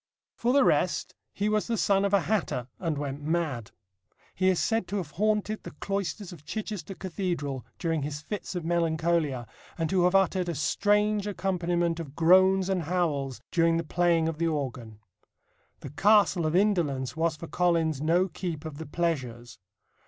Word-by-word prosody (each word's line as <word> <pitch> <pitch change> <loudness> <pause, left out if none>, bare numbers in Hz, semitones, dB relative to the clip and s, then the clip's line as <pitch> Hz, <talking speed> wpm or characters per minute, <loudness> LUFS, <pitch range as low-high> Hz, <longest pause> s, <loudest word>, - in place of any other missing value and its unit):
For 240 - 0
the 280 +1 +5
rest, - - +1 0.2
he 205 - -2
was 215 0 +1
the 230 -1 0
son 200 -1 +2
of 200 - 0
a 200 -2 +4
hatter, 170 - -1
and 165 -4 -2
went 140 0 -4
mad. 150 -8 -2 0.6
He 185 0 +2
is 185 - +2
said 225 -4 0
to 205 - -2
have 170 -6 -4
haunted 215 +3 0
the - - -10
cloisters 200 -1 -3
of 155 -4 -13
Chichester 205 -1 -5
Cathedral 170 -8 -3
during 165 -3 -1
his 145 +1 -4
fits 195 +4 -6
of 175 -2 -3
melancholia, 165 -5 0 0.3
and 165 -2 -1
to 185 -2 +3
have 180 +2 +3
uttered 185 -2 +2
a 170 - -2
strange 205 +8 +1
accompaniment 175 -3 -1
of 150 -4 -7
groans 185 +3 +5
and 190 -2 0
howls 150 -6 -1
during 165 -1 +3
the 165 - -1
playing 170 0 +2
of 165 -1 -3
the 170 - +1
organ. 130 -8 -4 0.8
The - - -8
Castle 200 -1 +4
of 155 - -1
Indolence 155 - +1
was 160 0 0
for 155 - -8
Collins 165 -4 +1
no 170 +4 +3
keep 165 -3 -5
of 155 -2 -7
the 160 - -6
pleasures. 130 -9 -3
170 Hz, 175 wpm, -28 LUFS, 155-195 Hz, 0.8 s, the